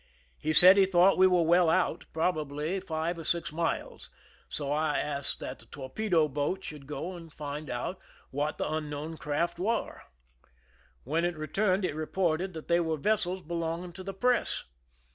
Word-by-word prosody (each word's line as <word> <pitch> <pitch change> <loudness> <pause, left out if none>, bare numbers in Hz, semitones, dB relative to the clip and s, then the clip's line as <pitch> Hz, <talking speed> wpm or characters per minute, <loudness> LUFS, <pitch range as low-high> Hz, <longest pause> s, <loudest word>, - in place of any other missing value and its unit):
He 155 - -1
said 180 +5 +8
he 195 -1 +6
thought 185 +1 +5
we 185 - +8
^\^ere 180 -2 +3
well 170 0 +5
out, 185 +2 +1
probably 155 +1 -1
five 165 0 -2
or - - -6
six 165 -1 -1
miles, 165 +2 -3 0.4
so 145 -2 -3
I 150 0 +1
asked 140 -2 -3
that 130 - -6
the - - -15
torpedo 160 +4 0
boat 150 +7 -2
should 145 -3 -8
go 155 +6 -4
and 165 -2 -11
find 150 -1 -6
out 125 +10 -3 0.3
what 145 +3 -1
the - - -1
unknown 155 +1 -4
craft 150 +5 -1
were. 225 +5 -1 1.0
When 160 +6 0
it 175 -1 0
re 155 - -4
turned 190 +4 +1
it - - -1
reported 170 +3 -1
that 160 -1 -8
they 170 0 +4
were 160 -2 0
vessels 185 +1 0
belonging 170 +2 -3
to 185 - -8
the 195 0 -6
press. 250 +4 +1
165 Hz, 175 wpm, -29 LUFS, 150-180 Hz, 1.0 s, said